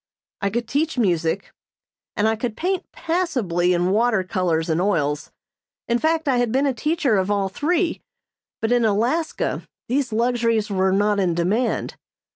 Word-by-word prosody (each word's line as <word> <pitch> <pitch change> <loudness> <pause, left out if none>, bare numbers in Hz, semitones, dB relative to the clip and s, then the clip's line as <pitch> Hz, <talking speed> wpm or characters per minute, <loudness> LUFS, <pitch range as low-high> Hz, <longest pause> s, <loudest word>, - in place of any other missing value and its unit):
I 200 - +1
could 235 +3 -2
teach 300 +4 -1
music, 175 -4 0 0.6
and 210 - +2
I 220 - +2
could 225 0 -4
paint 370 +2 -2
passably 245 - 0
in 175 +1 +2
water 220 -2 +2
colors 180 -4 0
and 165 +1 +1
oils; 150 -7 0 0.6
in 235 0 +1
fact, 320 +1 +1
I 260 -3 +3
had 245 -2 +1
been 265 +4 +2
a 275 - +1
teacher 290 - +1
of 190 +1 0
all 200 -2 +1
three, 335 - 0 0.6
but 225 - 0
in 245 -1 +3
Alaska 235 +10 0 0.3
these 260 -1 0
luxuries 230 -2 +1
were 190 -1 +2
not 205 +1 +2
in 180 -3 +1
demand. 205 +8 0
220 Hz, 160 wpm, -22 LUFS, 190-260 Hz, 0.6 s, I